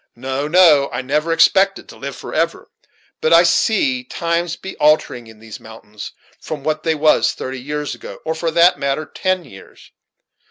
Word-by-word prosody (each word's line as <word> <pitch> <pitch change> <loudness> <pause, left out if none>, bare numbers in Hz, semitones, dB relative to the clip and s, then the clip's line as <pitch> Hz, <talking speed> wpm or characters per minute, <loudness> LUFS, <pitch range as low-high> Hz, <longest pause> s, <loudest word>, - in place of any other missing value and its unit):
No, 135 +4 -4
no, 155 -5 +5
I 125 +2 -4
never 150 +5 -1
expected 195 +4 +3
to - - -13
live - - -7
forever; - - -3 0.5
but 475 - +1
I - - +7
see, 260 -7 +1
times 170 -6 -2
be 190 - -9
altering 150 -6 +1
in 110 -1 -15
these 110 0 -11
mountains 110 -1 -11 0.3
from 150 -3 -7
what 155 +1 -2
they 160 0 0
was 155 0 +2
thirty 130 0 -7
years 150 +2 -4
ago, - - -10
or, 160 - -1
for 165 +1 -2
that 170 +2 +4
matter, 140 +2 -2
ten 185 -1 -2
years. 95 -1 -16
155 Hz, 170 wpm, -18 LUFS, 130-170 Hz, 0.5 s, I